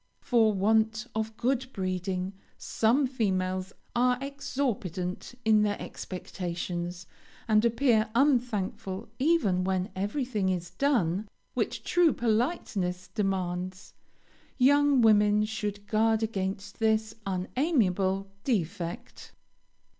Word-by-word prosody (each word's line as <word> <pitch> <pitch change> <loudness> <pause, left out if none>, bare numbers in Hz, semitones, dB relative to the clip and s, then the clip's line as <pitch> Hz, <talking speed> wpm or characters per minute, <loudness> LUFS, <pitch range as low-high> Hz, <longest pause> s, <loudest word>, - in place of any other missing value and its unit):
For 230 -4 +3
want 220 +3 +2
of 220 0 -3
good 260 +1 0
breeding 185 0 -2 0.2
some 240 +6 +2
females 185 -6 -1 0.2
are 250 +1 +3
exorbitant 245 - -3
in 215 -1 +5
their 205 -1 0
expectations, 175 -1 -5 0.4
and 215 -1 +4
appear 235 -1 +3
unthankful 225 -7 0
even 260 - +2
when 190 +2 -1
everything 210 0 -1
is 175 -2 -2
done 205 - +1 0.2
which - - -2
true 350 -5 +3
politeness 215 - -1
demands. 185 -2 -3 0.6
Young 285 0 +5
women 210 -1 +5
should 210 -2 -4
guard 220 +1 +2
against 195 -2 -3
this 220 0 +1
unamiable 195 - +1 0.2
defect. 175 - -3
210 Hz, 95 wpm, -28 LUFS, 185-240 Hz, 0.6 s, in